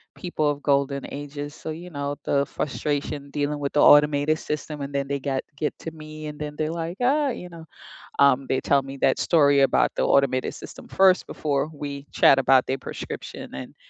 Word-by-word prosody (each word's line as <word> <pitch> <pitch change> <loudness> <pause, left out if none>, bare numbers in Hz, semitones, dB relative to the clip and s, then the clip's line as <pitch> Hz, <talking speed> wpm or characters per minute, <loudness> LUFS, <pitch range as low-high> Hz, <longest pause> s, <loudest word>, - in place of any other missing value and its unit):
People 155 -5 -1
of 145 -1 -3
golden 140 -1 +1
ages, 145 +1 -6
so, - - -8
you 170 +3 -7
know, 145 -1 -3
the 140 0 +2
frustration 145 0 -3
dealing 145 +1 -2
with 140 -1 -2
the 150 - +2
automated 150 +1 +5
system 150 0 -5
and 140 0 -5
then 140 0 -1
they 140 0 -2
got 135 -1 -2
get 150 +1 -2
to 165 - -6
me 155 -1 -10
and 150 0 -8
then 150 0 -5
they're, 155 0 -1
like, 170 +2 -4
"Ah," 280 +3 +2
you 180 -8 -6
know, 170 -2 -11 0.6
um, 140 -1 +4
they 130 - 0
tell 140 -1 +3
me 135 0 -8
that - - +2
story 145 -4 +4
about 135 - +3
the - - 0
automated 135 -2 +2
system - - -11
1st 190 -1 +4
before 145 -1 -1
we 140 -1 -6
chat 135 - +5
about 130 -1 +4
their 135 - -1
prescription - - -7
and, 65 -1 -8
145 Hz, 200 wpm, -24 LUFS, 140-155 Hz, 0.6 s, automated